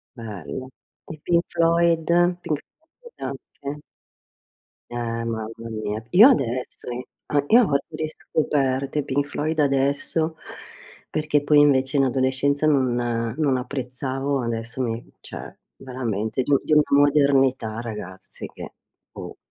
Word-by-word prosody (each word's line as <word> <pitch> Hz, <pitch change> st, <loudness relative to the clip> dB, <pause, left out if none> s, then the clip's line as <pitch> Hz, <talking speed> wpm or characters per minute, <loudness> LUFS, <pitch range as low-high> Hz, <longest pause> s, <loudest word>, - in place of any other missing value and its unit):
Bello. 110 Hz, -, -7 dB, 0.4 s
I 155 Hz, -, -8 dB
Pink 170 Hz, 0 st, +3 dB
Floyd, 170 Hz, -1 st, +3 dB, 0.4 s
Pink 150 Hz, -4 st, -2 dB, 0.4 s
Floyd 480 Hz, -1 st, -15 dB
anche. 145 Hz, +1 st, -6 dB, 1.1 s
Eh, 120 Hz, -, -8 dB
mamma 115 Hz, -2 st, -3 dB, 0.2 s
mia. 110 Hz, -1 st, -3 dB
Io 215 Hz, +9 st, +9 dB
adesso 125 Hz, -, -1 dB
i 125 Hz, +1 st, -5 dB, 0.4 s
io 240 Hz, +7 st, +7 dB
ho 140 Hz, -, +2 dB
riscoperto 140 Hz, -3 st, -1 dB
i 145 Hz, -, 0 dB
Pink 140 Hz, +2 st, 0 dB
Floyd 155 Hz, +2 st, -2 dB
adesso 145 Hz, +3 st, +1 dB, 0.7 s
perché 150 Hz, -1 st, 0 dB
poi 145 Hz, 0 st, +5 dB
invece 135 Hz, -1 st, +4 dB
in 135 Hz, -, +4 dB
adolescenza 135 Hz, +3 st, +1 dB
non 130 Hz, -5 st, +3 dB, 0.4 s
non 140 Hz, -4 st, +2 dB
apprezzavo. 130 Hz, +1 st, -3 dB
Adesso 115 Hz, +2 st, -3 dB
mi 115 Hz, -1 st, -2 dB
cioè -, -, -9 dB, 0.2 s
veramente 120 Hz, -3 st, -3 dB
di 140 Hz, +3 st, +2 dB
di -, -, -5 dB
una 150 Hz, 0 st, +6 dB, 0.2 s
modernità 135 Hz, -6 st, +3 dB
ragazzi 105 Hz, -5 st, -7 dB
che -, -, -10 dB, 0.4 s
boh. -, -, -8 dB
135 Hz, 120 wpm, -23 LUFS, 120-150 Hz, 1.1 s, Io